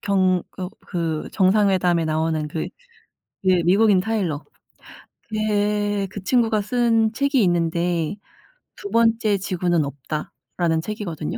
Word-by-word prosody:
경 185 -3 +2
어 185 -1 -4 0.2
그 165 -4 -3
정상회담에 185 -3 +3
나오는 155 -1 -1
그 155 +1 -3 0.8
예 185 -2 +4
미국인 195 +3 +4
타일러 190 -8 -2 0.9
걔 205 -1 0
그 200 - -7
친구가 225 0 +2
쓴 225 0 +2
책이 275 +1 +1
있는데 170 0 0 0.6
"2번째 230 - +1
지구는 180 -4 0
없다."라는 155 +4 -3
책이거든요. 180 -7 -5
190 Hz, 230 characters per minute, -22 LUFS, 170-215 Hz, 0.9 s, 예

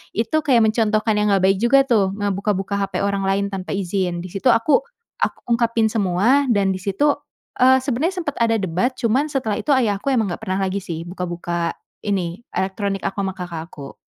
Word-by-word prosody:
itu 225 +1 -1
kayak 255 -7 +3
mencontohkan 215 -1 +2
yang 210 - +2
nggak 195 -2 +2
baik 195 +1 +4
juga 260 +5 +5
tuh, 205 -7 +1
ngebuka-buka 200 -1 -1
hape 195 - -3
orang 200 -1 0
lain 195 +1 +1
tanpa 190 -1 -4
izin. 180 -2 -2
Di 185 - -9
situ 195 +7 -2
aku, 235 - +4 0.4
aku - - 0
ungkapin 230 -2 +2
semua 220 +8 +2
dan 200 -5 +2
di 190 - -3
situ, 205 +11 +1 0.4
eee, 260 0 +5
sebenarnya 315 +8 -1
sempat 290 -3 -4
ada 230 -1 +3
debat 200 +5 -1
cuman 250 +6 +1
setelah 255 -8 -2
itu 290 - +2
ayahku 215 -3 0
emang 230 -8 +1
nggak - - -5
pernah 190 +1 -2
lagi 190 +1 -1
sih 165 -4 -6
buka-buka 175 -1 -3 0.2
ini, 185 -3 -2 0.2
elektronik 195 +1 -2
aku 195 - -3
ama 190 -1 -2
kakak 170 -3 -6
aku. 140 -5 -11
200 Hz, 185 wpm, -21 LUFS, 190-235 Hz, 0.4 s, juga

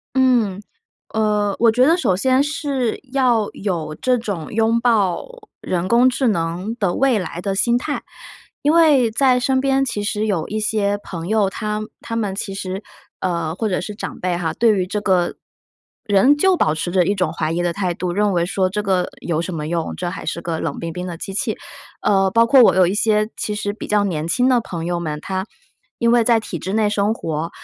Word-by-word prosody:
嗯， 240 -7 +2 0.5
呃， 210 -2 +1
我 230 0 +6
觉 250 +4 +3
得 330 - +5
首 245 - +1
先 260 +6 +3
是 285 -5 -2
要 245 -6 +2
有 170 -6 -3
这 250 +9 +1
种 200 -9 -5
拥 225 +1 +2
抱 215 -7 +2 0.4
人 180 0 -2
工 240 +4 +5
智 260 +1 0
能 180 +3 -2
的 195 -5 0
未 265 -4 +2
来 175 -2 -5
的 195 +1 -2
心 235 +5 +2
态。 290 +3 -4 0.6
因 295 - +3
为 290 -8 +5
在 250 +2 +3
身 260 +1 +1
边 270 0 +2
其 220 -4 -3
实 210 0 -1
有 190 -7 -1
一 215 +1 -2
些 205 -1 0
朋 170 -3 -6
友， 215 -2 +2
他 210 +2 -3 0.2
他 230 - -5
们 210 -4 -1
其 195 0 -4
实， 190 +1 -5 0.4
呃， 170 -3 -1
或 220 +4 -2
者 180 - 0
是 205 +3 -6
长 - - -7
辈 180 -1 -1
哈， 165 -2 -2
对 230 +6 +3
于 185 -1 0
这 210 +2 -3
个 185 -4 +1 0.7
人 215 +8 +4
就 375 +4 +3
保 155 - +2
持 165 +2 -3
着 180 0 +3
一 200 - +2
种 185 -5 -1
怀 160 -1 -2
疑 175 +1 -1
的 175 - 0
态 185 -2 -2
度， 175 +1 -3
认 205 +1 +1
为 170 -2 +1
说 185 +1 0
这 210 +3 -2
个 190 -3 0
有 165 -2 -1
什 170 +1 -4
么 150 -2 -4
用， 165 0 -2
这 175 -1 -3
还 165 - -7
是 170 +2 -3
个 165 -2 -3
冷 - - -3
冰 165 0 -4
冰 180 +2 -5
的 175 -2 -5
机 195 - -6
器。 190 - -2 0.5
呃， 195 -2 +3
包 230 +2 +5
括 265 +3 +6
我 - - +6
有 185 -1 +5
一 180 - 0
些 215 +1 +1
其 210 - -3
实 205 -1 -2
比 210 - -8
较 210 -1 +2
年 165 -5 -2
轻 245 +9 +2
的 255 -2 +4
朋 170 -7 -6
友 175 0 -2
们， 155 -3 -3
他 190 0 -3 0.5
因 235 0 +2
为 240 - +5
在 230 0 +4
体 205 -5 -5
制 190 +6 -4
内 215 -2 +2
生 205 +1 +1
活、 165 -4 -3
205 Hz, 235 characters per minute, -20 LUFS, 175-230 Hz, 0.7 s, 我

